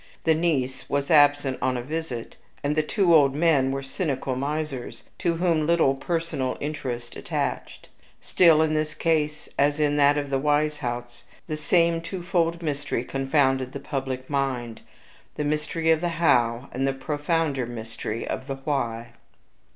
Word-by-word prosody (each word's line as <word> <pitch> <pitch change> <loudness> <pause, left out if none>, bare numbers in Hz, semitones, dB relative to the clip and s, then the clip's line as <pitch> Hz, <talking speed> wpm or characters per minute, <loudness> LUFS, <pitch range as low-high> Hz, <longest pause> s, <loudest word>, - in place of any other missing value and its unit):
The 160 - +4
niece 150 -6 -1
was 140 +2 -1
absent 145 -3 +4
on 130 -1 +1
a 120 - -4
visit, 145 -5 -5 0.3
and 145 +1 0
the 155 - +3
two 175 +2 +2
old 140 -4 +5
men 150 -4 +3
were 135 0 -3
cynical 135 -2 -2
misers, 140 -1 -4 0.2
to 170 -1 +1
whom 165 -3 +1
little 170 -5 +4
personal 165 -3 -2
interest 125 -5 -5
attached. - - -4 0.3
Still, 160 -3 +4
in 155 -1 0
this 155 0 -1
case 155 -2 0
as 145 +2 +3
in 145 -1 +2
that 145 0 +5
of 145 -1 -3
the 135 - +1
Weishaupts, 145 -5 -1 0.2
the 155 - -3
same 165 +2 +2
twofold 170 -1 -1
mystery 145 -5 -2
confounded 135 -1 +1
the 140 - -5
public 135 -2 -4
mind 130 -5 -2 0.5
the 150 - -2
mystery 150 +2 0
of 160 -1 +3
the 175 - 0
HOW, 120 -6 +2
and 135 +1 -1
the 135 - +1
profounder 145 -1 -1
mystery 115 -1 -5
of 130 - -4
the 135 - -3
WHY. 130 -5 -2
145 Hz, 155 wpm, -25 LUFS, 130-160 Hz, 0.5 s, old